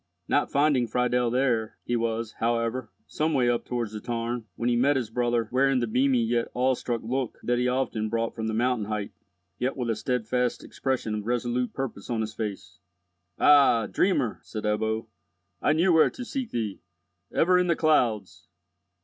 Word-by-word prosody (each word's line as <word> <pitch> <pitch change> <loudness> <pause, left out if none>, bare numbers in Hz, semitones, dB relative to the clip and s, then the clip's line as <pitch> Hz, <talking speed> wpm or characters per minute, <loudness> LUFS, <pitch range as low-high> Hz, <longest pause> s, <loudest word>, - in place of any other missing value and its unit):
Not 145 - +1
finding 140 -4 +3
Friedel 125 +1 +1
there, 120 -3 0
he 120 - -1
was, 115 -1 -1
however, 115 +1 -1 0.2
some 155 0 -1
way 125 -2 +3
up 120 -1 0
towards 120 -3 -3
the 105 - -4
tarn, 115 +1 -3
when 115 - -2
he 120 - +3
met 140 +5 +3
his 120 -5 -2
brother 120 -1 0
wearing 135 +1 +3
the 120 - 0
beamy 125 +1 +2
yet 115 +1 0
awestruck 125 -2 0
look 125 +1 -2
that 120 0 +1
he 125 - +1
often 125 -4 -1
brought 115 0 -1
from 110 0 -4
the 110 - -2
mountain 120 -2 +1
height, 105 -1 -3 0.5
yet 130 +2 -1
with 120 -3 -1
a - - 0
steadfast 125 +1 -1
expression 130 -5 -2
of 105 0 -4
resolute 120 +1 -1
purpose 130 -7 -5
on 115 -2 0
his 110 0 -4
face. 100 -5 -6 0.6
"Ah, 140 -6 +5
dreamer!" 140 - +1
said 110 - -7
Ebbo, 110 +1 0 0.6
"I 150 - +3
knew 170 +3 +3
where 160 - +6
to 250 - -8
seek 260 -1 -4
thee! 110 -4 -3 0.5
Ever 180 +2 +4
in 180 - +1
the 170 - +3
clouds!" 120 - +1
120 Hz, 180 wpm, -26 LUFS, 110-130 Hz, 0.6 s, where